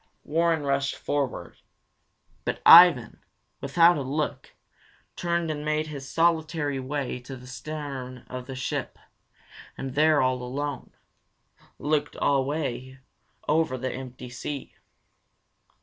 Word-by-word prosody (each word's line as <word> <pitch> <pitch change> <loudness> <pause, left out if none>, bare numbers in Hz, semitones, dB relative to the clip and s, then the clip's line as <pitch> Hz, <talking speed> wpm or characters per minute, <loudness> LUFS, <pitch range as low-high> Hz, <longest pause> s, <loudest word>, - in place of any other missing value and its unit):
Warren 165 0 +1
rushed 140 0 0
forward. 135 -11 -3 0.9
But - - -2
Ivan, 165 -9 +8 0.4
without 170 0 +5
a - - -2
look, 140 +3 -3 0.6
turned 170 -2 -1
and 150 -1 -4
made 155 0 0
his 140 -3 -8
solitary 160 -4 +1
way 130 -1 -3
to 130 +2 -9
the 125 0 -12
stern 130 -2 -7
of 130 0 -7
the 135 - -6
ship, 130 - -3 0.8
and 135 -1 -5
there, 155 +1 +4
all 130 -1 +1
alone, 140 +3 -4 0.9
looked 150 0 -1
away 135 -2 -1 0.5
over 155 -4 +1
the 130 +1 -3
empty 125 -1 -8
sea. 140 +3 -6
140 Hz, 115 wpm, -26 LUFS, 130-155 Hz, 0.9 s, Ivan